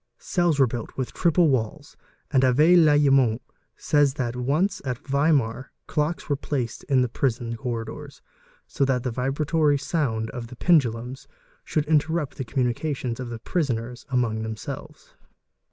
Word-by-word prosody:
Cells 175 -4 0
were 135 - +7
built 120 -2 -6
with 130 -2 -3
triple 170 -1 +3
walls, 130 +3 -2 0.4
and 135 -3 +4
Avé 145 +7 +5
Lallemant 140 -7 +4 0.4
says. 145 -2 +2
that 125 -4 -2
once 150 +11 0
at 130 -3 -3
Weimar 135 -4 +1
clocks 155 +3 -2
were 145 - +1
placed 135 -4 -3
in 130 -2 +3
the - - 0
prison 120 -1 -2
corridors, 120 +4 -6 0.4
so - - -2
that 130 -2 +1
the 125 - -2
vibratory 145 +4 +1
sound 125 -8 -1
of 120 -2 -6
the 125 - -11
pendulums 130 -3 +1 0.4
should 150 -2 -1
interrupt 155 0 0
the 135 - -3
communica 130 +4 -1
tions 125 -2 -4
of 125 -2 -5
the 120 - -5
prisoners 125 -4 -3
among 120 -4 0
themselves. 110 -1 -7
135 Hz, 150 wpm, -24 LUFS, 120-150 Hz, 0.4 s, were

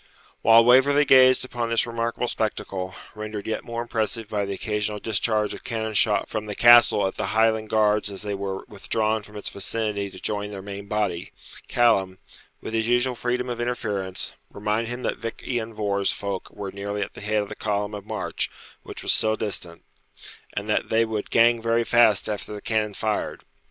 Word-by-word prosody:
While 115 +1 +7
Waverley 140 +4 +5
gazed 130 -1 +6
upon 120 -2 -3
this 115 -1 +2
remarkable 115 +1 -2
spectacle, 95 -4 -3 0.2
rendered 105 -1 -6
yet 110 - -3
more 115 0 -4
impressive 115 -1 -2
by 105 -2 -1
the 100 - -3
occasional 105 +1 -2
discharge 110 0 0
of - - -10
cannon 110 -1 -3
shot 105 0 +3
from 110 -1 -4
the 105 - -5
Castle 120 -3 +7
at 95 - -3
the 110 - -2
Highland 110 -1 +2
guards 105 -1 +2
as 100 +1 -6
they 105 -1 -3
were 95 -1 -4
withdrawn 110 +2 -1
from 105 0 -14
its 105 - -5
vicinity 100 0 -2
to 95 - -11
join 105 +1 -2
their 100 -2 -7
main 100 0 -7
body, 100 -4 -2 0.4
Callum, 100 -6 +2 0.4
with - - -6
his 110 0 0
usual 120 +1 +2
freedom 125 +1 -2
of 120 -1 -3
interference, 105 -6 -3 0.2
reminded 105 +3 -2
him 120 +1 -5
that - - -1
Vich 115 -1 -6
lan 115 -3 -2
Vohr's 100 -2 0
folk 100 -2 -4
were 100 -2 -7
nearly 100 +1 -3
at - - -8
the - - -10
head 105 0 0
of 100 - -10
the - - -6
column 105 0 -2
of 105 -1 -6
march - - -3 0.3
which - - -8
was - - +3
still 110 0 +3
distant, 90 -6 -4 0.7
and 100 +1 -4
that 105 - 0
'they 115 +1 +3
would 110 -2 -4
gang 115 0 +4
very 115 +1 +2
fast 115 -4 +4
after 105 -1 -4
the 105 - -5
cannon 105 -1 -1
fired.' 110 +1 -2
110 Hz, 190 wpm, -24 LUFS, 100-115 Hz, 0.7 s, While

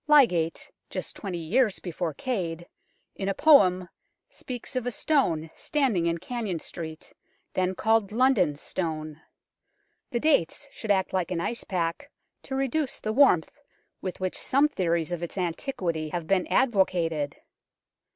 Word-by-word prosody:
Lydgate, 195 - +4 0.2
just - - -5
twenty 190 -4 -4
years 200 +6 +1
before 170 -3 -4
Cade, 175 - -3 0.5
in 195 0 -2
a 195 - -1
poem 185 - +5 0.4
speaks 250 +1 -7
of 250 -1 -1
a - - +2
stone 175 - +1
standing 250 - +1
in 170 0 +1
Cannon 215 -2 -3
Street, 160 0 -8 0.4
then 185 0 0
called 220 -1 +2
London 220 - +3
Stone. 155 0 -4 0.9
The 240 - -1
dates 285 - +1
should 220 - -8
act 190 -2 +2
like 185 -3 0
an 180 - -2
icepack 185 +4 -2 0.3
to 265 - -5
reduce 270 +2 0
the 215 - -2
warmth 220 - +5 0.5
with 185 - -5
which 185 -1 -2
some 280 +3 +3
theories 170 - -1
of 175 -1 -3
its 175 +3 -5
antiquity 170 - -2
have 170 +1 -3
been 185 +1 +1
advocated. 175 - +1
185 Hz, 140 wpm, -27 LUFS, 165-245 Hz, 0.9 s, poem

